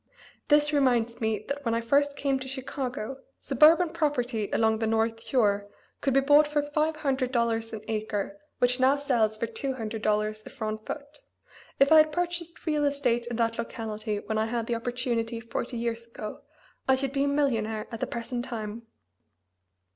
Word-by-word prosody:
This 295 0 +4
reminds 240 -4 +2
me 220 -2 -1
that 285 0 -4
when 230 -2 0
I - - +1
first 280 +4 +2
came 275 -2 0
to 260 - -6
Chicago 265 -2 -4 0.2
suburban 315 +6 +5
property 260 -10 -1
along 220 -1 +2
the 225 - 0
North 225 +1 +1
Shore 205 -5 +1 0.3
could 270 -2 +1
be 275 - +6
bought 290 +2 +6
for 295 -1 0
five 305 +2 0
hundred 270 -4 -1
dollars 230 -2 0
an 220 -2 -6
acre 215 +5 -3 0.2
which 250 +1 +2
now 260 +2 +5
sells 235 -7 +1
for 230 - -1
two 265 +4 -3
hundred 225 -2 -4
dollars 215 0 0
a - - -10
front 215 -3 -5
foot; 290 0 -7 0.6
if 275 +2 +5
I 315 - +9
had 310 0 +6
purchased 345 0 -3
real 300 -2 +1
estate 250 -5 +1
in 240 - -3
that 230 0 0
locality 220 -2 -3
when 220 0 -1
I 220 - +1
had 230 0 -2
the 235 - -1
opportunity 235 -1 -2
forty 235 +1 -4
years 230 0 -3
ago 215 -2 -7 0.5
I 265 - +7
should 270 0 -2
be 275 0 +2
a - - +1
millionnaire 225 -7 0
at 230 - -5
the - - -1
present 240 +1 -4
time. 225 -2 -6
240 Hz, 185 wpm, -28 LUFS, 225-280 Hz, 0.6 s, I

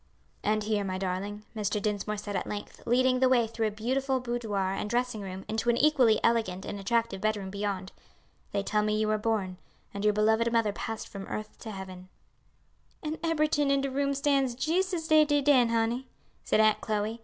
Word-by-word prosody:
"And 215 0 +1
here, 210 -1 0
my 185 -1 -3
darling," 195 +3 -3
Mr. 210 -1 -1
Dinsmore 210 0 -2
said 205 0 -5
at - - -2
length, 205 0 -6
leading 255 +1 +3
the 260 0 +4
way 245 -3 +4
through 225 0 -1
a - - -2
beautiful 260 +5 -1
boudoir 220 -6 -2
and 210 - -3
dressing 240 -2 -1
room 190 -1 -7
into 220 +2 -1
an 235 - +3
equally 260 -7 +4
elegant 220 -6 +1
and 205 - -5
attractive 225 -1 0
bedroom 205 -3 -1
beyond, 200 -2 -3 0.6
"they 200 0 -1
tell 210 +1 +1
me 215 0 +1
you 215 - +1
were 215 0 +1
born, 210 -4 -1 0.4
and 200 - -4
your 210 -1 +3
beloved 220 +2 +3
mother 225 -3 +2
passed 225 +1 -5
from 195 -1 -8
earth 215 0 -5
to 225 - -8
heaven." 185 -2 -8 0.9
"An' 310 +1 -3
eberyting 305 -3 +2
in 275 0 +3
de 275 0 -2
room 280 +1 0
stands 275 -3 +1
jees' 335 +9 0
as 330 -3 -3
dey 310 -1 +6
did 290 -2 +1
den, 255 -5 +5
honey," 230 +3 0 0.4
said - - +2
Aunt 215 -1 +4
Chloe. 215 +1 -2
220 Hz, 200 wpm, -29 LUFS, 205-255 Hz, 0.9 s, dey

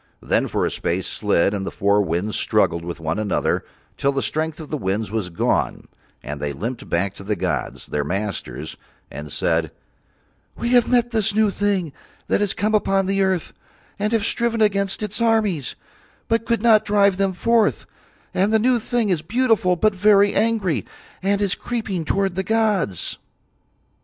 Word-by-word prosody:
Then - - 0
for - - 0
a - - -1
space 90 +3 -1
Slid 100 -2 +1
and 100 -2 -2
the - - -3
four 100 +1 +2
winds 95 +3 -1
struggled 85 0 +1
with 85 0 -6
one 80 +3 -2
another 105 -2 0 0.3
till 140 0 +1
the 135 -1 -1
strength 155 +1 -2
of 155 - -9
the 155 - -1
winds 100 -1 -2
was 110 -5 -2
gone, 85 - -1 0.4
and 75 +1 -6
they 75 0 -2
limped 115 - -5
back 95 +3 0
to 100 - -11
the 105 +1 -1
gods, 85 - -3
their 75 - -2
masters, 80 - -4 0.3
and 75 0 -7
said: - - 0 0.9
"We 235 - -2
have 245 -1 +4
met 240 -1 +2
this 215 -3 +1
new 215 -1 +3
thing 195 -7 -1 0.3
that - - +1
has 205 -2 +1
come 215 +1 0
upon 195 -2 +2
the 195 +1 0
earth 190 -3 0 0.5
and 210 +1 0
have 225 -3 +1
striven 235 -1 +2
against 200 -1 +1
its 210 +2 -2
armies, 215 - +1 0.5
but 230 0 0
could 235 -2 0
not 220 -3 +6
drive 200 -2 +3
them 195 -1 +1
forth; 230 +3 +2 0.5
and 195 +3 +2
the 220 - +5
new 245 +2 +2
thing 230 -1 0
is 175 -5 +1
beautiful 220 -1 +2
but 215 +4 +2
very 200 +1 +4
angry, 190 - +1 0.4
and 200 +2 +1
is 195 -3 +3
creeping 215 -8 -3
towards 195 +2 0
the 190 - -1
gods." 205 - 0
195 Hz, 175 wpm, -22 LUFS, -, 0.9 s, not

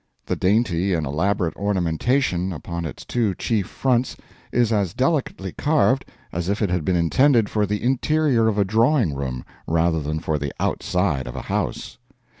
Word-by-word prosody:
The - - -1
dainty 95 -2 +1
and 80 -2 -1
elaborate 85 +4 0
ornamentation 95 - 0
upon 85 +1 -5
its 80 - -7
two 110 -6 0
chief 105 -5 -1
fronts 125 -1 0 0.3
is 120 -2 +2
as 100 -5 0
delicately 130 - 0
carved 145 - +2 0.3
as 85 +2 -3
if 100 - 0
it 105 -5 0
had 90 -3 0
been 90 +3 +1
intended 110 - +3
for 105 -1 +1
the 105 +2 -2
interior 135 -1 +2
of 110 -2 0
a 100 - +3
drawing 115 - +2
room 65 -3 -4 0.2
rather 80 0 +2
than 75 +2 -2
for 80 -2 -1
the 70 0 -3
outside 90 -9 0
of - - -7
a - - -5
house. - - -3
95 Hz, 170 wpm, -22 LUFS, 85-120 Hz, 0.3 s, intended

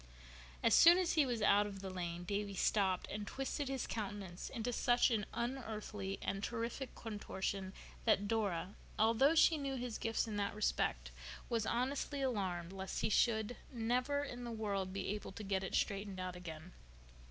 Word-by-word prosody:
As - - +5
soon 340 +1 +9
as 365 -2 +2
he 305 -5 +4
was 235 -3 -1
out 205 0 +5
of 195 -1 -7
the 190 -1 -5
lane 175 -1 -4
Davy 200 +2 -2
stopped 190 -1 +2
and 205 0 -4
twisted 270 +3 -2
his 270 -2 -2
countenance 200 -4 -5
into 245 0 -3
such 245 +2 +4
an 215 -2 0
unearthly 220 -5 -3
and 195 +1 -2
terrific 235 +4 -3
contortion 195 -3 -3 0.3
that 205 -3 +3
Dora, 200 -4 0 0.2
although 230 +8 +4
she 320 -1 +6
knew 275 -1 -2
his 245 -3 -4
gifts 225 0 0
in 210 -2 -3
that 200 +1 -1
respect, - - 0 0.4
was 230 -2 0
honestly 270 +3 -1
alarmed 190 -8 -1
lest 190 0 -4
he - - +1
should 220 +1 +2
never 250 +4 0
in 245 -3 -6
the 240 - -4
world 200 -4 -2
be 195 0 -3
able 205 -1 -4
to 215 - -7
get 195 -1 0
it 190 - -2
straightened 200 -1 -1
out 185 -1 -3
again. 175 -1 -8
210 Hz, 175 wpm, -37 LUFS, 195-245 Hz, 0.4 s, soon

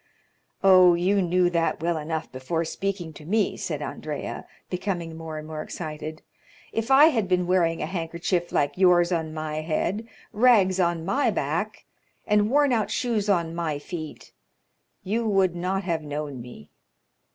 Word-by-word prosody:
"Oh, 185 -2 +7
you 190 +4 +2
knew 180 0 +2
that 170 -1 0
well 170 +1 0
enough 160 0 -4
before 160 +6 -2
speaking 180 -1 -4
to 155 - -12
me," 210 +6 +1
said - - -4
Andrea, - - -5 0.2
becoming 175 -3 -3
more 160 -1 -7
and 155 - -7
more 155 -1 -5
excited. 155 -1 -6 0.5
"If 225 +2 -2
I 285 +4 +8
had 225 -10 0
been 180 -1 +1
wearing 175 -2 +1
a - - 0
handkerchief 170 +1 -2
like 145 +5 0
yours 175 -1 +5
on 160 -2 -1
my 155 -1 -4
head, 185 +7 -2 0.3
rags 210 -5 +4
on 170 -2 +1
my 265 +10 +2
back, - - -2 0.4
and 210 0 +3
worn 285 0 +3
out 220 -3 0
shoes 220 -5 -1
on 170 -4 +1
my 165 -3 -2
feet, 155 +1 -8 0.7
you 225 +4 -1
would 190 -4 +2
not 185 +3 -1
have 170 -3 -1
known 145 -3 -5
me." 115 -12 -12
175 Hz, 160 wpm, -25 LUFS, 160-195 Hz, 0.7 s, I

